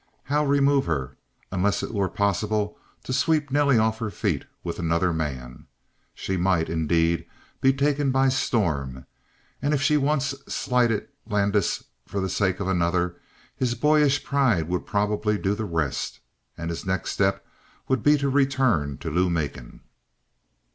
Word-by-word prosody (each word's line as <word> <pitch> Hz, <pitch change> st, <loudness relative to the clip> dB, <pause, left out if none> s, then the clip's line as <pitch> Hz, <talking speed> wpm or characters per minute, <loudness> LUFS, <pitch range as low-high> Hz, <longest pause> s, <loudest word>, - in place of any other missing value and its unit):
How 145 Hz, +2 st, +1 dB
remove 140 Hz, -1 st, +3 dB
her, 70 Hz, -5 st, -2 dB, 0.4 s
unless 100 Hz, +2 st, +1 dB
it -, -, -5 dB
were 100 Hz, -3 st, 0 dB
possible 105 Hz, +1 st, 0 dB, 0.3 s
to 130 Hz, -, -4 dB
sweep 145 Hz, +1 st, +1 dB
Nelly 140 Hz, -2 st, +4 dB
off 110 Hz, 0 st, +1 dB
her 110 Hz, -2 st, -2 dB
feet 100 Hz, -, -2 dB, 0.2 s
with -, -, -4 dB
another 85 Hz, +1 st, +1 dB
man? 65 Hz, -6 st, -5 dB, 0.5 s
She 95 Hz, -, -3 dB
might, 90 Hz, -3 st, +1 dB
indeed, 80 Hz, +1 st, +1 dB, 0.3 s
be 135 Hz, -, +5 dB
taken 140 Hz, +1 st, +1 dB
by 135 Hz, +1 st, +3 dB
storm, 80 Hz, -, -1 dB, 0.6 s
and 145 Hz, +2 st, +1 dB
if 135 Hz, -, -1 dB
she 150 Hz, +2 st, +4 dB
once 140 Hz, -1 st, +1 dB
slighted 120 Hz, -4 st, +1 dB, 0.2 s
Landis 100 Hz, -2 st, +1 dB, 0.2 s
for 100 Hz, -, -3 dB
the 95 Hz, 0 st, -1 dB
sake 95 Hz, -2 st, 0 dB
of 100 Hz, -, -2 dB
another, 90 Hz, -1 st, 0 dB, 0.4 s
his 125 Hz, -2 st, 0 dB
boyish 150 Hz, -1 st, +3 dB
pride 125 Hz, -, +2 dB
would 90 Hz, 0 st, -2 dB
probably 105 Hz, +1 st, 0 dB
do 100 Hz, 0 st, 0 dB
the 110 Hz, +1 st, -3 dB
rest, 80 Hz, -7 st, -2 dB, 0.4 s
and 85 Hz, 0 st, -4 dB
his 85 Hz, -, -5 dB
next 95 Hz, 0 st, -2 dB
step 100 Hz, 0 st, 0 dB, 0.4 s
would 130 Hz, -3 st, +1 dB
be 150 Hz, +4 st, +5 dB
to 140 Hz, 0 st, -1 dB
return 130 Hz, -, +2 dB
to -, -, -4 dB
Lou 90 Hz, +3 st, +2 dB
Macon. 70 Hz, -8 st, -4 dB
105 Hz, 155 wpm, -25 LUFS, 85-135 Hz, 0.6 s, be